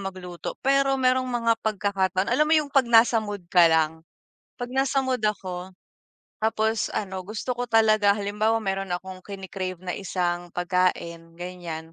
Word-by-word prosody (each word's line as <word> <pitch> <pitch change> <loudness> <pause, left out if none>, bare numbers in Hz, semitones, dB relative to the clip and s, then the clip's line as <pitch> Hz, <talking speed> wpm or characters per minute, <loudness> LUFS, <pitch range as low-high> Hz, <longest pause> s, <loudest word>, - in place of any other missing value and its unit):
magluto. 185 -3 -6
Pero 275 0 +3
merong 255 0 +2
mga 230 -2 +2
pagkakataon, 195 -3 0
alam 300 +4 +4
mo 315 - +2
yung 295 -2 0
'pag 270 -2 +4
nasa 230 0 +5
mood 205 -3 -6
ka 175 -1 +6
lang? 160 0 +1 0.5
'Pag 245 -1 -5
nasa 270 +1 +1
mood 255 -3 -1
ako, 185 -3 -2 0.7
tapos 220 0 0
ano, 190 -2 -3
gusto 215 +6 -4
ko 245 0 -4
talaga 215 -3 +4
halimbawa 210 +2 0
meron 195 0 -2
akong 185 +1 -5
kini-crave 190 -2 -6
na 180 - -2
isang 175 -2 -2
pagkain, 175 -2 -1
ganiyan. 170 -2 -7
200 Hz, 150 wpm, -25 LUFS, 180-230 Hz, 0.7 s, ka